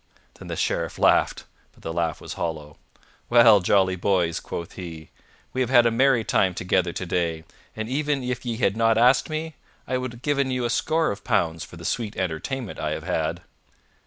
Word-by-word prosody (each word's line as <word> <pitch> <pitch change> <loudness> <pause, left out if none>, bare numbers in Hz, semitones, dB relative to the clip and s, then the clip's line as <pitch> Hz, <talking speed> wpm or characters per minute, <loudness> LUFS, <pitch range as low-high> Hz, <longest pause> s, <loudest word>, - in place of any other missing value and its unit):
Then - - -10
the - - -4
Sheriff - - -1
laughed, - - +3 0.3
but - - -22
the 80 - -4
laugh 85 -1 -1
was - - -7
hollow. 75 -3 -5 0.5
"Well, 115 -3 +7
jolly 95 0 +2
boys," 90 -3 +1
quoth 85 - -6
he, 80 -4 -9 0.4
"we 130 - -1
have 125 - 0
had 120 -2 +6
a 115 - +3
merry 125 0 +3
time 95 -4 +1
together 90 -1 0
today, 85 -2 -2 0.3
and 110 0 -4
even 145 +1 -1
if 125 -1 -3
ye 120 -3 -3
had 100 -4 +1
not 115 0 +3
asked 125 +6 +4
me, 155 +1 -4 0.3
I 130 -1 -1
would 125 -1 -4
have 120 - -13
given 140 -2 +1
you 125 -1 -1
a 120 - 0
score 160 +6 +1
of 100 - -7
pounds 80 -1 0
for 90 - -11
the 85 - -10
sweet 110 +1 -2
entertainment 95 - -3
I 75 0 -1
have 80 - -5
had." 85 -1 -2
105 Hz, 195 wpm, -24 LUFS, 85-125 Hz, 0.5 s, Well